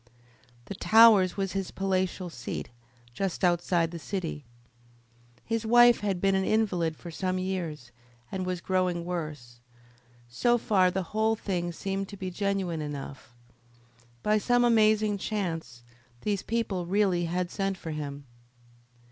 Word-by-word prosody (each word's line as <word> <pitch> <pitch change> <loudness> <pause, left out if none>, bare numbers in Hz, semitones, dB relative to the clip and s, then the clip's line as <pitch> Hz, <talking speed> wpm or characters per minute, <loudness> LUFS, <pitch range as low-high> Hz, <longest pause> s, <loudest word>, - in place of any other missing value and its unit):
The - - -6
Towers 215 -3 +6
was 195 -1 -1
his 195 -1 -3
palatial 185 -2 -1
seat, 120 - -6 0.4
just 190 +6 -3
outside 175 -1 +2
the 170 - -6
city. 165 -3 -4 1.0
His 230 -1 -1
wife 240 +1 +6
had 200 -3 -1
been 195 +1 +2
an 190 0 +2
invalid 185 -7 +1
for 170 - -9
some 185 +2 -2
years, 170 -9 -4 0.4
and 190 -1 -3
was 180 -1 -3
growing 180 -2 0
worse. 150 -9 -5 0.7
So 240 - +2
far 190 -5 +3
the 190 +1 -2
whole 220 +1 +2
thing 175 -5 -2
seemed 195 +3 -4
to 200 - -9
be 185 -1 -5
genuine 190 -4 -1
enough. 140 -4 -7 0.9
By 215 0 +3
some 245 +3 +2
amazing 215 -3 +3
chance 165 - -4 0.4
these 205 -2 -1
people 210 -6 -2
really 190 -2 +2
had 180 +1 -2
sent 195 -1 -2
for 165 - -6
him. 145 -2 -6
185 Hz, 140 wpm, -28 LUFS, 170-205 Hz, 1.0 s, Towers